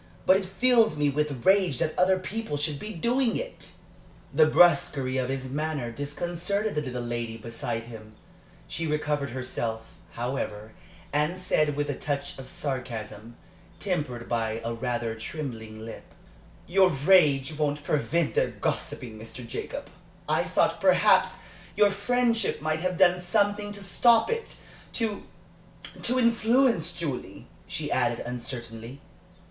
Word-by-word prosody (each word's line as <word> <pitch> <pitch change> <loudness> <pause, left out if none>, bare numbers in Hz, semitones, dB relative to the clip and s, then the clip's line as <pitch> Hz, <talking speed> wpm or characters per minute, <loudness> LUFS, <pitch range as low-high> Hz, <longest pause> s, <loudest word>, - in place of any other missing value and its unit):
But 190 - +6
it 195 - -3
fills 230 -3 +4
me 145 -1 +2
with 145 -3 -2
rage 190 -7 +4
that 155 - -1
other 185 +1 +4
people 190 -4 -4
should 145 0 -2
be 215 - -6
doing 235 +6 +1
it." - - -7 0.6
The 155 +2 +6
brusquerie 140 -6 +4
of 130 0 -1
his 130 -1 -3
manner 145 -4 -2
disconcerted 175 - -2
the 150 - 0
little 125 -3 -4
lady 120 -1 -3
beside 115 0 -4
him. 110 -2 -11 0.5
She 165 - -3
recovered 150 -2 -1
herself, 120 -3 -3 0.3
however, 115 -3 -4 0.4
and 150 +5 +1
said, 155 -5 +1
with 145 0 -1
a 145 - -1
touch 140 +1 -3
of 130 - -8
sarcasm, 115 -5 -5 0.4
tempered 145 -11 -2
by 115 -1 -1
a 115 - -1
rather 120 -1 -2
trembling 110 -3 -6
lip: 115 - -10 0.5
"Your 190 +1 +4
rage 150 -2 +4
won't 145 -1 -1
prevent 155 +3 0
their - - +2
gossiping, 110 -3 -3
Mr. 115 +2 -8
Jacob, - - -5 0.4
I - - +2
thought, - - +1
perhaps, - - +4 0.3
your 205 0 +5
friendship 230 +3 +1
might 155 +1 -1
have 180 +1 -1
done 180 -1 +5
something 205 +3 +1
to 200 -1 -7
stop 225 - +4
it 460 0 -3 0.4
to 220 -3 -1 0.8
to 250 +2 +1
influence 235 - +3
Julie," 150 -7 -5 0.2
she - - -4
added, - - +1
uncertainly. 120 0 -6
150 Hz, 140 wpm, -27 LUFS, 120-190 Hz, 0.8 s, But